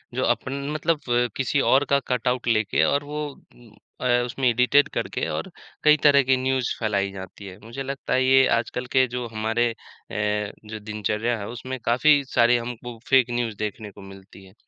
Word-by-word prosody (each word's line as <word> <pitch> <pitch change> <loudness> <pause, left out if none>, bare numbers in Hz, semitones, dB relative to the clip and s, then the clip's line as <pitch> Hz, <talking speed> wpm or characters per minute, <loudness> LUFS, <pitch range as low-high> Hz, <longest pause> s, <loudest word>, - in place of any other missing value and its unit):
जो - - 0
अपन 130 - 0 0.2
मतलब 155 0 0 0.4
किसी 135 +2 0
और 135 +2 +3
का 140 - +4
कटआउट 125 0 -1
लेके 110 -3 +2
और 140 +1 +1
वो 150 +1 -4 0.3
उम 115 -3 -19 0.3
अ, 125 - 0 0.2
उसमें 125 +2 -1
एडिटेड 125 +4 +4
करके - - -2
और - - -4 0.3
कई 150 0 +6
तरह 140 -1 +6
की 130 +1 +3
न्यूज़ 130 -1 0
फैलाई 100 -3 0
जाती 95 +1 -10
है। 95 -1 -10
मुझे 115 +5 -7
लगता 135 0 -4
है 130 - +3
ये 135 0 +6
आजकल 120 +2 -3
के 130 0 +6
जो 125 0 -4
हमारे 115 +2 0
अ, - - -7 0.9
जो 110 0 -7
दिनचर्या 105 +2 -2
है, 100 - -6
उसमें 130 +3 -6
काफ़ी 140 +5 +4
सारी 120 0 +5
हमको 120 0 -7
फेक 130 -2 +4
न्यूज़ 120 -3 -2
देखने 105 0 -5
को - - -14
मिलती 95 0 -14
है। 95 - -18
120 Hz, 185 wpm, -24 LUFS, 110-130 Hz, 0.9 s, कई